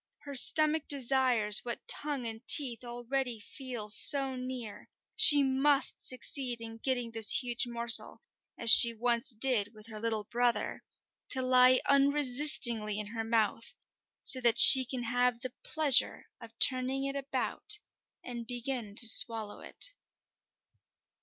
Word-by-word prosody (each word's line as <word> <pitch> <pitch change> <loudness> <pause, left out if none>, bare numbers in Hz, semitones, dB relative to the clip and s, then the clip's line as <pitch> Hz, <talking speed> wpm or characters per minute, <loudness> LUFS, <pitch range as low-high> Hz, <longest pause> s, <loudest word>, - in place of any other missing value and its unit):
Her 285 -1 -12
stomach 310 +3 +3
desires 255 -6 0
what 240 -1 -9
tongue 285 -4 -1
and 225 -1 -7
teeth 255 -5 +2
already 245 0 -7
feel 240 -1 -11
so 270 +5 +6
near; 250 -4 -11 0.3
she 295 -10 +5
must 270 +1 -3
succeed 255 -1 -6
in 225 0 -11
getting 245 -2 -5
this 225 +3 -1
huge 240 0 -5
morsel 235 -1 +1 0.3
as 230 -1 +4
she 235 -1 +5
once 235 +1 -4
did 225 -3 -3
with 215 0 -18
her 215 -1 -12
little 220 -1 -6
brother 240 +3 -5 0.5
to 260 -1 -6
lie 255 0 +1
unresistingly 275 -6 0
in 210 -1 -8
her 225 -1 -7
mouth, 225 0 -5 0.5
so 255 - +7
that 235 -1 +1
she 260 +1 +8
can 250 -1 -8
have 245 0 -4
the 255 0 -9
pleasure 305 -5 +1 0.2
of 230 0 -17
turning 260 +2 +1
it 275 0 -7
about 280 +9 -4 0.5
and 235 -2 -11
begin 245 -3 -8
to 230 - +4
swallow 220 -2 +3
it. - - -9
245 Hz, 140 wpm, -27 LUFS, 230-270 Hz, 0.5 s, she